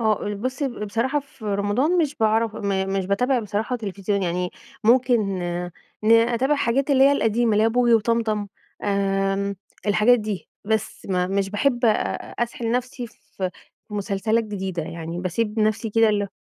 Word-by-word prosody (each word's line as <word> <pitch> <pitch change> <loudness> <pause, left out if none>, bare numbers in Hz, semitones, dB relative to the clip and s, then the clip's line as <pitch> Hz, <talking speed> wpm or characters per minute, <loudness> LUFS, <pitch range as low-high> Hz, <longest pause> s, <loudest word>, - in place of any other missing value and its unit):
آه، 220 -2 +1
آآ 205 - -2
بصي، 255 +7 -2
ب 240 -4 -6
بصراحة 250 +8 0
في 265 -4 -16
رمضان 210 - +1
مش 300 -4 +1
باعرف 220 0 +1
م 200 - -3 0.3
مش 190 - -2
باتابع 250 +7 +2
بصراحة 215 +3 -2
تلفزيون، 200 -2 -2
يعني 180 0 -1 0.3
ممكن 245 +1 +4 0.8
ن 220 - +5
أتابع 235 +4 +3
الحاجات 275 0 +1
اللي 270 -1 +6
هي 280 - +6
القديمة، 230 -3 +2
اللي 210 +1 +3
هي - - +5
بوجي 240 0 +3
وطمطم، 220 -2 +1 0.4
آمم، 195 0 0 0.3
الحاجات 215 +4 +5
دي، 210 -3 -4 0.2
بس. 220 0 -2
م 180 -1 0
مش 195 -1 0
باحب 240 +4 +1
أ - - +6 0.5
أسحل 235 -1 -3
نفسي 250 +1 -2
في 190 -4 -6 0.4
مسلسلات 210 +2 0
جديدة، 190 -4 -4
يعني 165 +1 -6
بسيب 210 +5 -2
نفسي 215 +1 +1
كده 225 +1 +4
ال 205 -1 0
220 Hz, 160 wpm, -23 LUFS, 200-240 Hz, 0.8 s, اللي